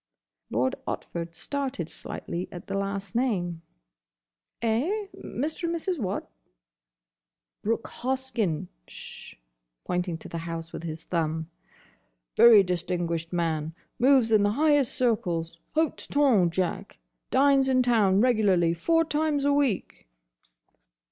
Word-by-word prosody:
Lord 125 Hz, +3 st, +1 dB
Otford 170 Hz, -1 st, -5 dB
started 265 Hz, -, -3 dB
slightly 170 Hz, +1 st, -5 dB
at 175 Hz, -, -9 dB
the 195 Hz, -, -5 dB
last 195 Hz, -1 st, -3 dB
name. 185 Hz, -9 st, -1 dB, 1.0 s
"Eh? 295 Hz, -, 0 dB
Mr. 310 Hz, +6 st, -4 dB
and 335 Hz, 0 st, 0 dB
Mrs. 340 Hz, 0 st, -2 dB
what?" 195 Hz, -4 st, -3 dB, 1.3 s
"Brooke 230 Hz, +2 st, -1 dB
Hoskyn. 240 Hz, -, -2 dB, 0.2 s
Sh!" -, -, -9 dB, 0.5 s
pointing 180 Hz, -1 st, -1 dB
to -, -, -10 dB
the 170 Hz, -, -5 dB
house 165 Hz, 0 st, -6 dB
with -, -, -5 dB
his 160 Hz, -1 st, -6 dB
thumb. 160 Hz, -1 st, -2 dB, 0.8 s
"Very 225 Hz, -4 st, +8 dB
distinguished 175 Hz, -2 st, -2 dB
man. 160 Hz, -2 st, -1 dB, 0.2 s
Moves 255 Hz, -3 st, +5 dB
in 215 Hz, -2 st, +5 dB
the 205 Hz, 0 st, +2 dB
highest 290 Hz, -1 st, +3 dB
circles. 175 Hz, -, 0 dB, 0.2 s
Hote 320 Hz, -1 st, 0 dB
tonn, 255 Hz, -12 st, +4 dB
Jack. 180 Hz, +1 st, -3 dB, 0.3 s
Dines 275 Hz, 0 st, +4 dB
in 255 Hz, -1 st, +4 dB
town 210 Hz, -5 st, +3 dB
regularly 200 Hz, -9 st, +3 dB
four 330 Hz, -, +2 dB
times 300 Hz, -2 st, 0 dB
a 285 Hz, -, +4 dB
week." 270 Hz, -, -1 dB
205 Hz, 120 wpm, -27 LUFS, 170-265 Hz, 1.3 s, Very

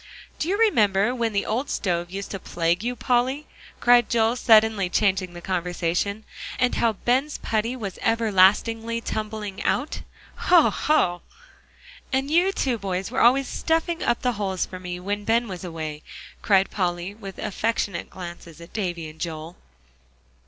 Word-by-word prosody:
"Do 310 Hz, -, -1 dB
you 400 Hz, -, +1 dB
remember 215 Hz, -, +3 dB
when 235 Hz, -3 st, -1 dB
the 200 Hz, -1 st, 0 dB
old 250 Hz, +6 st, -2 dB
stove 175 Hz, -3 st, -1 dB
used 195 Hz, +2 st, -6 dB
to 195 Hz, -, -4 dB
plague 170 Hz, +2 st, -1 dB
you, 245 Hz, +1 st, -2 dB
Polly?" 255 Hz, +5 st, 0 dB, 0.3 s
cried 240 Hz, -1 st, +5 dB
Joel, 230 Hz, 0 st, +2 dB
suddenly 220 Hz, -5 st, +4 dB
changing 190 Hz, -2 st, +1 dB
the 175 Hz, -, -8 dB
conversation. 180 Hz, +3 st, -1 dB, 0.3 s
"And 250 Hz, -, +2 dB
how 230 Hz, -1 st, +2 dB
Ben's 260 Hz, +8 st, 0 dB
putty 225 Hz, +3 st, -1 dB
was 200 Hz, -7 st, -6 dB
everlastingly 225 Hz, +1 st, +3 dB
tumbling 215 Hz, -3 st, -4 dB
out? 280 Hz, +5 st, -1 dB, 0.4 s
Hoh 350 Hz, -3 st, +5 dB
hoh!" 175 Hz, -, +1 dB, 0.9 s
"And 270 Hz, +2 st, 0 dB
you 350 Hz, +4 st, +4 dB
two 255 Hz, -, -1 dB
boys 190 Hz, -1 st, -3 dB
were -, -, 0 dB
always 260 Hz, +3 st, +5 dB
stuffing 330 Hz, +1 st, -1 dB
up 240 Hz, -, 0 dB
the 250 Hz, -, +2 dB
holes 190 Hz, -2 st, -1 dB
for 185 Hz, -, -9 dB
me, 180 Hz, -1 st, -5 dB
when 205 Hz, +3 st, -3 dB
Ben 230 Hz, +2 st, +2 dB
was 185 Hz, -2 st, -7 dB
away," 160 Hz, -3 st, -5 dB, 0.4 s
cried 195 Hz, -2 st, +3 dB
Polly, 175 Hz, 0 st, -2 dB
with 200 Hz, -3 st, -9 dB
affectionate 210 Hz, -3 st, -2 dB
glances 175 Hz, -3 st, -9 dB
at 170 Hz, +1 st, -13 dB
Davie 175 Hz, -6 st, -3 dB
and 155 Hz, +1 st, -13 dB
Joel. 165 Hz, 0 st, -5 dB
210 Hz, 155 wpm, -24 LUFS, 180-240 Hz, 0.9 s, cried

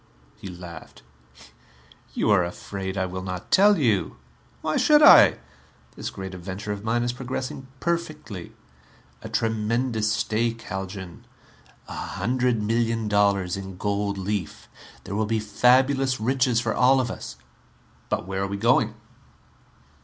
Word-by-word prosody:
He -, -, -10 dB
laughed. 90 Hz, -3 st, -10 dB, 1.1 s
"You -, -, +1 dB
are 100 Hz, -3 st, +5 dB
afraid 95 Hz, +2 st, -5 dB
I 95 Hz, -, +1 dB
will 95 Hz, 0 st, -5 dB
not 90 Hz, -1 st, -6 dB
tell 205 Hz, +1 st, +6 dB
you! 115 Hz, -, +1 dB, 0.5 s
Why 155 Hz, -1 st, -1 dB
should 300 Hz, 0 st, +5 dB
I? 295 Hz, -, +8 dB, 0.6 s
This -, -, -5 dB
great 95 Hz, 0 st, -7 dB
adventure 95 Hz, +3 st, -6 dB
of 100 Hz, 0 st, -5 dB
mine 115 Hz, +2 st, 0 dB
is 120 Hz, 0 st, -1 dB
progressing 130 Hz, +1 st, -5 dB
perfectly. 155 Hz, -, -4 dB, 0.7 s
A -, -, -8 dB
tremendous 110 Hz, 0 st, 0 dB
stake, 115 Hz, +2 st, -1 dB
Haljan. 95 Hz, -1 st, -7 dB, 0.6 s
A -, -, -8 dB
hundred 125 Hz, -2 st, -1 dB
million 115 Hz, 0 st, 0 dB
dollars 100 Hz, -3 st, +2 dB
in 95 Hz, -1 st, -7 dB
gold 100 Hz, 0 st, -1 dB
leaf. 95 Hz, -3 st, -4 dB, 0.4 s
There 100 Hz, -, -7 dB
will 105 Hz, +1 st, 0 dB
be 110 Hz, 0 st, 0 dB
fabulous 130 Hz, +5 st, +3 dB
riches 125 Hz, +1 st, +2 dB
for 115 Hz, -2 st, -1 dB
all 130 Hz, +2 st, +4 dB
of 125 Hz, -2 st, -1 dB
us -, -, -8 dB, 0.3 s
" -, -, -33 dB
"But -, -, -1 dB
where 95 Hz, 0 st, -3 dB
are 100 Hz, -, -1 dB
we 100 Hz, 0 st, -4 dB
going?" 115 Hz, 0 st, +2 dB
110 Hz, 140 wpm, -24 LUFS, 95-125 Hz, 1.1 s, I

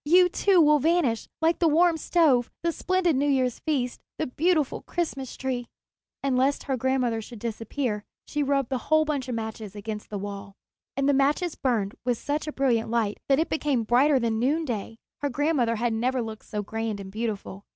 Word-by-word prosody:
You, 360 Hz, +4 st, +5 dB
too, 380 Hz, +1 st, +3 dB
will 300 Hz, -2 st, +6 dB
vanish, 300 Hz, -6 st, +1 dB
like 330 Hz, +1 st, +3 dB
the 340 Hz, -, +4 dB
warm 335 Hz, +2 st, +4 dB
stove, 300 Hz, -7 st, +3 dB
the 340 Hz, -, +2 dB
splendid 365 Hz, -1 st, +1 dB
New 280 Hz, +2 st, +1 dB
Year's 260 Hz, -3 st, +1 dB
feast, 260 Hz, -6 st, -2 dB, 0.2 s
the 315 Hz, -, -1 dB
beautiful 310 Hz, +2 st, +1 dB
Christmas 275 Hz, -7 st, -4 dB
Tree." 250 Hz, -2 st, -3 dB, 0.6 s
And 275 Hz, -2 st, +1 dB
lest 270 Hz, +3 st, +2 dB
her 270 Hz, -, -1 dB
grandmother 250 Hz, -2 st, 0 dB
should 235 Hz, +2 st, -10 dB
disappear, 225 Hz, 0 st, -3 dB, 0.2 s
she 295 Hz, -, -2 dB
rubbed 275 Hz, -2 st, +1 dB
the 260 Hz, -2 st, -1 dB
whole 310 Hz, 0 st, +5 dB
bundle 285 Hz, -4 st, -2 dB
of 245 Hz, -, -2 dB
matches 220 Hz, -2 st, -5 dB
against 210 Hz, +1 st, -6 dB
the 210 Hz, -, -4 dB
wall. 200 Hz, 0 st, -7 dB, 0.4 s
And 275 Hz, 0 st, +1 dB
the 285 Hz, -, +4 dB
matches 295 Hz, +5 st, +2 dB
burned 225 Hz, -6 st, 0 dB
with 245 Hz, -2 st, 0 dB
such 295 Hz, +4 st, -3 dB
a -, -, -2 dB
brilliant 245 Hz, -6 st, +1 dB
light 225 Hz, -3 st, 0 dB
that 270 Hz, -, +5 dB
it 320 Hz, -, +1 dB
became 290 Hz, -6 st, 0 dB
brighter 265 Hz, +6 st, +4 dB
than 230 Hz, -3 st, 0 dB
noonday. 245 Hz, -5 st, -1 dB, 0.2 s
Her 285 Hz, -, 0 dB
grandmother 275 Hz, -4 st, +1 dB
had 235 Hz, +1 st, 0 dB
never 250 Hz, +3 st, 0 dB
looked 220 Hz, -1 st, -8 dB
so 210 Hz, -1 st, -4 dB
grand 220 Hz, 0 st, -3 dB
and 190 Hz, -1 st, -8 dB
beautiful. 210 Hz, -2 st, -4 dB
260 Hz, 195 wpm, -26 LUFS, 225-300 Hz, 0.6 s, will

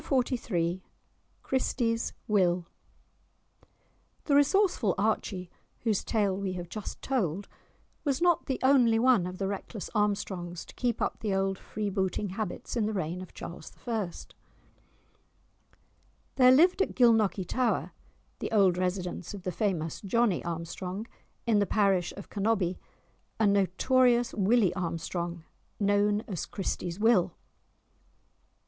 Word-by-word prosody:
*Chapter 255 Hz, -2 st, +1 dB
XLIII* 175 Hz, -6 st, -1 dB, 0.6 s
*Christie's 235 Hz, -3 st, 0 dB
Will* 180 Hz, -5 st, +2 dB, 1.6 s
The 290 Hz, -, 0 dB
resourceful 290 Hz, -, +3 dB
Archie, 195 Hz, -3 st, -1 dB, 0.3 s
whose 220 Hz, -4 st, 0 dB
tale 205 Hz, -4 st, +1 dB
we 195 Hz, -1 st, -3 dB
have 175 Hz, -1 st, -6 dB
just 215 Hz, -2 st, -7 dB
told, 200 Hz, -, -1 dB, 0.6 s
was 280 Hz, -2 st, 0 dB
not 345 Hz, -2 st, +2 dB
the 265 Hz, -, -1 dB
only 255 Hz, -4 st, +5 dB
one 230 Hz, -6 st, +4 dB
of 180 Hz, 0 st, -6 dB
the 195 Hz, -, -1 dB
reckless 200 Hz, +1 st, -5 dB
Armstrongs 190 Hz, -5 st, -1 dB
to -, -, -14 dB
keep 240 Hz, -3 st, -1 dB
up -, -, -2 dB
the 205 Hz, -3 st, -1 dB
old 195 Hz, 0 st, 0 dB
freebooting 200 Hz, -1 st, -2 dB
habits 200 Hz, +1 st, -4 dB
in 220 Hz, -3 st, +1 dB
the 215 Hz, -, -2 dB
reign 180 Hz, -1 st, -2 dB
of 185 Hz, -, -11 dB
Charles 170 Hz, -, -8 dB
I. 220 Hz, -7 st, -1 dB, 2.2 s
There 255 Hz, -1 st, +7 dB
lived 350 Hz, +8 st, +5 dB
at -, -, 0 dB
Gilnockie 225 Hz, -6 st, +4 dB
tower 245 Hz, +6 st, 0 dB, 0.5 s
(the -, -, -4 dB
old 190 Hz, -5 st, +4 dB
residence 180 Hz, 0 st, -2 dB
of 195 Hz, -, -10 dB
the 185 Hz, -, -2 dB
famous 175 Hz, -6 st, -2 dB
Johnie 215 Hz, -1 st, +1 dB
Armstrong) 175 Hz, +4 st, -5 dB, 0.4 s
in 220 Hz, -3 st, +3 dB
the 200 Hz, -, +2 dB
parish 195 Hz, -4 st, +2 dB
of 200 Hz, -, -8 dB
Cannobie, 200 Hz, -4 st, 0 dB, 0.6 s
a 220 Hz, -, +4 dB
notorious 235 Hz, +5 st, +3 dB
Willie 205 Hz, -2 st, +3 dB
Armstrong, 170 Hz, -1 st, -3 dB, 0.4 s
known 205 Hz, 0 st, +2 dB
as 190 Hz, -7 st, -5 dB
Christie's 180 Hz, -2 st, -4 dB
Will. 210 Hz, -5 st, +3 dB
200 Hz, 130 wpm, -29 LUFS, 180-230 Hz, 2.2 s, There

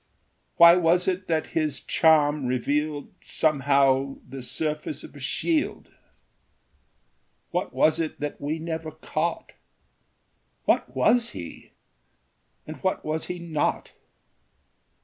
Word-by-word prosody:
Why 170 Hz, +1 st, +9 dB
was 175 Hz, +1 st, +2 dB
it 185 Hz, 0 st, -1 dB
that 160 Hz, -2 st, -1 dB
his 155 Hz, -3 st, 0 dB
charm 150 Hz, -4 st, +3 dB
revealed 145 Hz, +4 st, -1 dB
Somehow 140 Hz, -2 st, +2 dB
the 135 Hz, -1 st, -8 dB
surface 155 Hz, -, -3 dB
of -, -, -11 dB
a -, -, -10 dB
shield? 320 Hz, -3 st, -1 dB, 1.6 s
What -, -, -2 dB
was 155 Hz, +1 st, +2 dB
it 160 Hz, -2 st, -3 dB
that 145 Hz, 0 st, -5 dB
we 150 Hz, +3 st, -2 dB
never 160 Hz, -1 st, -4 dB
caught? -, -, -3 dB, 1.1 s
What 125 Hz, -, +1 dB
was 230 Hz, -, +2 dB
he, 85 Hz, -2 st, -10 dB, 0.9 s
and 155 Hz, -, -8 dB
what 190 Hz, -1 st, -2 dB
was 155 Hz, +1 st, -2 dB
he 180 Hz, -, -4 dB
not? 165 Hz, -3 st, -2 dB
155 Hz, 110 wpm, -25 LUFS, 145-165 Hz, 1.6 s, Why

